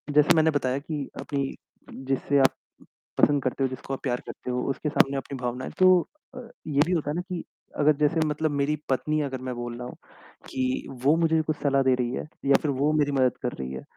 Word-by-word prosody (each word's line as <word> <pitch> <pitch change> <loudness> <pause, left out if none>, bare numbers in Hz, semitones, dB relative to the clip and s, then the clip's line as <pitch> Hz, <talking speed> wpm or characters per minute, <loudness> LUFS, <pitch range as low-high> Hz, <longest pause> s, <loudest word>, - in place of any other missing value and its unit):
जैसे 150 +2 +6
मैंने 160 0 +4
बताया 135 -3 0
कि 150 +1 -5 0.2
अपनी 140 -2 -3 0.5
जिससे 135 +1 +1
आप 135 - +5 0.7
पसंद 145 -1 +4
करते 130 +1 -1
हो, - - +3
जिसको 130 +1 -6
आप 135 - -3
प्यार 125 -2 -1
करते 125 - -6
हो, 125 0 -1
उसके 150 +2 -3
सामने 140 -1 +2
अपनी 135 0 -5
भावनाएँ 125 +1 -3
तो 185 0 +7 0.5
अ, - - -6 0.3
ये 145 -1 +2
भी 180 - -1
होता 155 -4 0
है - - -3
ना 175 - -1
कि 180 -2 -4 0.4
अगर 150 +1 +5
जैसे 150 +2 +2
मतलब 150 +1 0
मेरी 145 +1 +1
पत्नी 150 +4 +1
अगर 135 -3 -3
मैं 125 - -3
बोल 120 0 -5
रहा 125 - -6
हूँ, - - -9 0.5
कि 130 0 -2 0.2
वो 145 +3 +5
मुझे 160 -1 +3
कुछ 155 0 -1
सलाह 140 -1 +3
दे 130 -1 +4
रही 125 -1 -1
है - - -4 0.2
या 140 - +5
फिर 150 - +1
वो 140 +3 +1
मेरी 145 -1 +2
मदद 130 -2 +2
कर 125 - -1
रही 65 0 -4
है 65 - -6
140 Hz, 230 wpm, -26 LUFS, 130-150 Hz, 0.7 s, तो